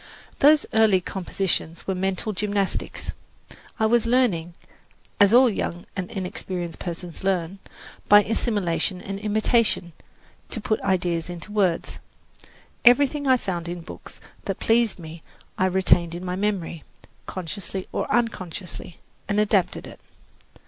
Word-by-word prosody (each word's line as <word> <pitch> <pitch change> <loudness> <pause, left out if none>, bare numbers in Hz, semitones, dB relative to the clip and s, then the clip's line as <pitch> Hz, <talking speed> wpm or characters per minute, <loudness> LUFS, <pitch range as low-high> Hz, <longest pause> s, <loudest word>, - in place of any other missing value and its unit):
Those 300 +2 +6
early 220 -4 +5
compositions 180 -2 -3
were 190 - -1
mental 190 +3 -1
gymnastics. 200 0 -1 0.7
I 220 - +3
was 235 +1 +3
learning, 195 -10 +1 0.6
as 205 -1 +6
all 250 +2 +7
young 175 -5 -3
and 185 -2 -3
inexperienced 180 -2 -5
persons 175 0 -6
learn, 190 -1 -1 0.5
by 205 0 +8
assimilation 200 -5 -1
and 195 +1 -6
imitation, 215 -3 +1 0.6
to - - -3
put 215 0 -1
ideas 175 -3 0
into 175 +4 -7
words. 190 -5 0 0.8
Everything 280 +3 +5
I 260 -1 +6
found 175 -6 -4
in 175 0 -5
books - - -10 0.3
that - - -3
pleased 230 -1 +2
me 165 -1 -10 0.3
I 185 - +2
retained 180 -2 +3
in 180 +2 -6
my 180 0 -2
memory, 185 -6 -2 0.4
consciously 185 +1 -4
or - - -2
unconsciously, 185 -7 -2 0.3
and 205 +1 +2
adapted 205 -3 +1
it. - - -11
190 Hz, 130 wpm, -24 LUFS, 175-215 Hz, 0.8 s, by